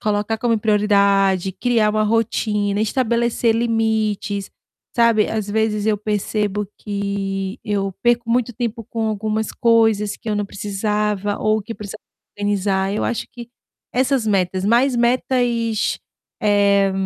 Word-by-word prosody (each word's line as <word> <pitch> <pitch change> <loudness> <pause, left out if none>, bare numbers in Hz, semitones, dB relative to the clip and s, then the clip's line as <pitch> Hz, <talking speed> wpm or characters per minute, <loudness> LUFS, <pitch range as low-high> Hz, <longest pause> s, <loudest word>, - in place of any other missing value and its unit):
Colocar 210 +1 0
como 230 -1 +1
prioridade, 200 -3 +2
criar 230 -1 +1
uma 215 0 +1
rotina, 210 -2 0
estabelecer 235 0 +1
limites, 220 -3 -1 0.4
sabe, 230 -3 +4
às 215 -2 -3
vezes, 215 -1 0
eu 215 -1 +2
percebo 210 0 -2
que 200 0 -3
eu 195 -2 -1
perco 240 -1 +2
muito 245 0 +1
tempo 230 0 -4
com 225 +1 -3
algumas 215 0 -2
coisas 225 -3 +2
que - - -9
eu 210 - 0
não 205 - -1
precisava 205 0 -2
ou 215 0 +1
que 230 - -7
eu - - -12
precisava 210 0 -8 0.4
organizar, 200 -1 0
eu 210 - -1
acho 240 - -2
que 240 -1 -9 0.4
essas 260 -1 +1
metas 190 -2 0
mais 245 +4 +3
metas, 245 +2 +1
e 230 -2 -1
ch 210 - 0 0.4
eh, 200 -1 +3
210 Hz, 140 wpm, -20 LUFS, 200-230 Hz, 0.4 s, sabe